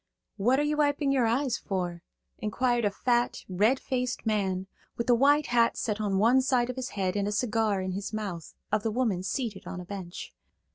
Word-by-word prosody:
"What 245 +7 +3
are - - +2
you 300 0 0
wiping 290 -1 +2
your 255 -4 +3
eyes 245 +2 0
for?" 175 -3 -3 0.4
inquired 240 +2 0
a - - +4
fat, 240 +4 0
red 210 +8 +2
faced 250 -2 -2
man, 190 -4 0 0.3
with 235 - -2
a - - +7
white 285 +5 +4
hat 235 -1 +2
set 215 -1 -2
on 200 -2 0
one 235 +6 +5
side 255 -1 +1
of - - -10
his 260 0 -4
head 185 -1 0
and 200 0 0
a - - -1
cigar 215 -2 +1
in 185 0 -3
his 195 +2 -4
mouth, 195 -7 -5 0.2
of 215 0 +2
the 225 - -1
woman 220 -5 0
seated 210 0 -3
on 180 - -5
a 180 - -7
bench. 185 -2 -7
225 Hz, 205 wpm, -28 LUFS, 195-255 Hz, 0.4 s, a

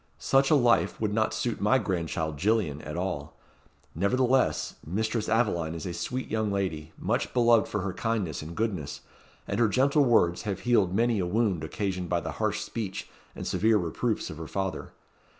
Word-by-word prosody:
Such 135 0 +3
a 155 - +6
life 120 -4 +3
would 105 -2 -1
not 110 0 +1
suit 120 -2 -2
my 105 +6 +4
grandchild, 85 - -2
Gillian, 95 -6 +1
at 75 +2 -6
all. 75 -6 -3 0.6
Nevertheless, 125 +8 +2
Mistress 110 +5 -1
Aveline 85 -8 +1
is 80 - -6
a 90 - -3
sweet 125 +10 -3
young 110 -1 -1
lady, 80 -6 -2
much - - -1
beloved 120 -2 +5
for 105 - -2
her 95 0 -3
kindness 105 -9 -2
and 80 +2 -8
goodness; 95 -10 -2 0.5
and 100 - -2
her 115 - +5
gentle 140 +6 +3
words 100 -9 +3
have 100 -4 -3
healed 110 -7 +3
many 115 0 +2
a 90 - 0
wound 100 -5 +1
occasioned 90 +2 -3
by 85 - +2
the - - -5
harsh 110 0 0
speech 110 -3 -5 0.3
and - - -6
severe 110 0 +3
reproofs 105 +6 -2
of 80 - -8
her 80 -1 -6
father. 95 -1 -3
100 Hz, 180 wpm, -28 LUFS, 85-115 Hz, 0.6 s, a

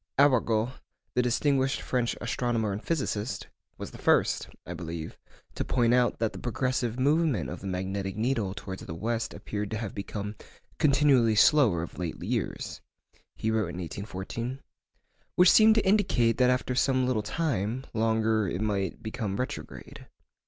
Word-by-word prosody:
Arago, 120 -4 +3 0.4
the 125 - +3
distinguished 135 +2 +1
French 125 -2 -1
astronomer 115 -3 -1
and 100 +3 -4
physicist, 130 -8 -2 0.3
was - - -7
the - - -11
first - - +2 0.2
(I - - -5
believe) 85 -2 -6 0.4
to - - -2
point 120 -2 +2
out 125 -1 +3
that 115 -1 -1
'the - - -7
progressive 125 -1 -1
movement 140 - +2
of - - -7
the 100 - -6
magnetic 95 +1 -3
needle 110 -4 0
towards 95 -2 -7
the 80 - -6
west 115 +5 -2
appeared 105 -1 -5
to 110 - -3
have 110 -3 -4
become 100 +1 -5 0.4
continually 140 -6 +4
slower 110 - +5
of 85 - -8
late 85 -3 -4
years' - - -3 0.5
(he 110 - -1
wrote 110 -5 0
in 85 - -7
1814), 100 +8 -5 0.7
'which 180 0 +7
seemed 220 0 +7
to 220 - +2
indicate 130 - +3
that 125 0 +5
after 125 0 +1
some 130 0 +2
little 125 -4 +1
time 120 - -2
longer 110 -1 +2
it 90 - -3
might 100 -4 -2
become 110 -2 -3
retrograde. 130 +3 -6
115 Hz, 155 wpm, -28 LUFS, 100-130 Hz, 0.7 s, which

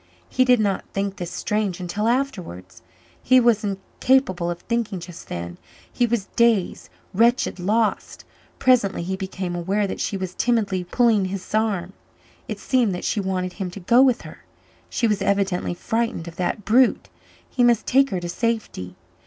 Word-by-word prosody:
He 255 - +3
did 250 -2 +5
not 200 -3 0
think 195 0 -2
this 175 -3 -5
strange 210 -4 -2
until 185 +5 -2
afterwards. 190 - -3 0.4
He 255 0 +5
was 235 -3 +3
incapable 195 -1 0
of 175 0 -4
thinking 230 -5 -2
just 170 0 -10
then; 85 0 -6 0.3
he 240 - +2
was 230 -4 -1
dazed, 230 -6 +2 0.2
wretched, 230 0 +2
lost. 215 +4 -1 0.3
Presently 240 -9 +2
he 190 +2 -2
became 190 -2 -4
aware 195 +4 0
that 195 - -5
she 200 - -2
was 185 -1 -5
timidly 205 -6 0
pulling 220 +1 +2
his 185 0 -6
arm. 200 -5 0 0.5
It - - -4
seemed 245 -8 +1
that 180 - -6
she - - 0
wanted 185 -2 -2
him 190 -1 -4
to 180 - -9
go 235 +7 +4
with 260 -3 +3
her - - -12 0.5
she 235 - 0
was 210 -3 +1
evidently 195 -3 0
frightened 225 -3 -2
of 165 - -9
that 185 +3 -2
brute 245 +3 +3 0.4
he 250 - 0
must 240 -2 +3
take 275 +1 +4
her 190 - -2
to 175 - -4
safety. 205 - -3
200 Hz, 170 wpm, -23 LUFS, 180-235 Hz, 0.5 s, did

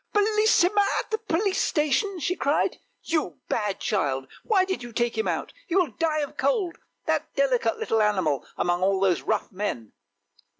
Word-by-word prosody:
" - - -44
Bellissima 420 -2 +4 0.2
at - - -6
the 440 - 0
police 395 -1 0
station!" 340 +6 +1
she 350 +4 0
cried; 285 -3 0 0.2
"you 305 - -1
bad 210 -3 -1
child! 135 -10 -1 0.2
Why 390 -5 +3
did 380 -5 -3
you 240 -1 -8
take 240 +1 0
him 220 - -1
out! - - -2
he 350 - -2
will 360 -8 +3
die 310 +4 0
of 290 - -5
cold! 385 -8 0 0.3
That - - 0
delicate - - +2
little 330 - +1
animal 185 -10 +1
among 175 0 +1
all 190 +1 +2
those 190 -3 +2
rough 215 0 -1
men! 185 - -4
300 Hz, 175 wpm, -26 LUFS, -, 0.3 s, Bellissima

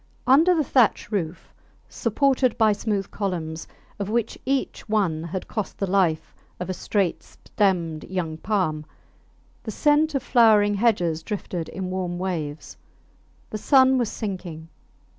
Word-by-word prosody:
Under 310 +8 +5
the 315 - +2
thatch 250 -5 +2
roof 180 -5 -4 0.3
supported 255 +1 +1
by 220 -1 +4
smooth 205 -1 -2
columns, 170 -5 -4 0.3
of 200 0 -3
which 230 0 -1
each 270 -3 -2
one 190 -8 +1
had 180 +2 -5
cost 215 -4 -4
the 195 - -1
life 180 -4 +1 0.3
of 180 +1 -3
a - - -2
straight 190 0 -1
stemmed 170 -6 -1
young 170 -4 -3
palm, 160 -6 -1 0.8
the - - -7
scent 295 +6 +2
of 270 - -1
flowering 215 -4 +5
hedges 195 -7 +1
drifted 180 -2 -5
in 185 -1 -5
warm 180 -2 -3
waves. 160 -5 -4 0.7
The 215 - -4
sun 260 +1 +5
was 235 -3 0
sinking. 180 -6 -6
200 Hz, 140 wpm, -24 LUFS, 175-230 Hz, 0.8 s, Under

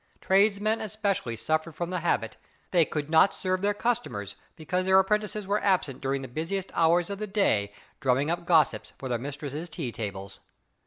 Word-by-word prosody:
Tradesmen 205 +3 +2
especially 200 - -2
suffered 155 +6 -1
from 175 0 -3
the 180 - -1
habit. 155 -9 0 0.4
They 170 -3 +4
could 150 -1 -3
not 160 +5 +5
serve 185 0 -1
their 205 +1 +1
customers 205 - -2 0.2
because 180 +3 -2
their 190 0 +6
apprentices 210 +1 +1
were 200 +2 0
absent 175 -9 +1
during 135 0 -1
the - - -5
busiest 170 +8 -3
hours 170 +3 +3
of 200 - -5
the 215 - -3
day 110 - +1 0.3
drumming 140 +2 +1
up 170 0 -3
gossips 160 -5 +3
for 135 - -6
their 120 -2 -1
mistresses' 145 +4 -5
tea 140 -9 -4
tables. 100 -3 -6
170 Hz, 175 wpm, -27 LUFS, 135-195 Hz, 0.4 s, their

